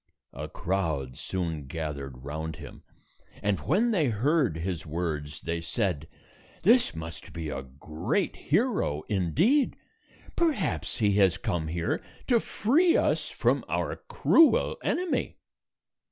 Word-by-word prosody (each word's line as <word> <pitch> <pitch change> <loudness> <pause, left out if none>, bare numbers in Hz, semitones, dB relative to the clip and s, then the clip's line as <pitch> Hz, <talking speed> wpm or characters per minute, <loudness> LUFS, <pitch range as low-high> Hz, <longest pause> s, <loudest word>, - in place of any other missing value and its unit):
A - - -6
crowd 80 -9 -2
soon 80 -6 -3
gathered 70 -4 -5
round 80 +2 -4
him, - - -11 0.6
and 100 -1 +1
when 215 - +2
they 170 -9 +2
heard 125 - +2
his 85 0 -3
words, 75 -2 -3
they 85 0 -2
said, 85 - -1 0.6
"This 230 - +5
must 80 +1 -8
be 80 -2 -4
a 70 -1 -3
great 80 - -2
hero, 170 - 0
indeed. 160 - +2 0.6
Perhaps 295 - 0
he 105 -4 +3
has 95 -4 +4
come 80 -3 -2
here 85 +1 -1 0.2
to 240 -3 +4
free 320 - +3
us - - +1
from - - +1
our - - -1
cruel 325 -2 +4
enemy." 360 -1 -1
90 Hz, 125 wpm, -28 LUFS, -, 0.6 s, This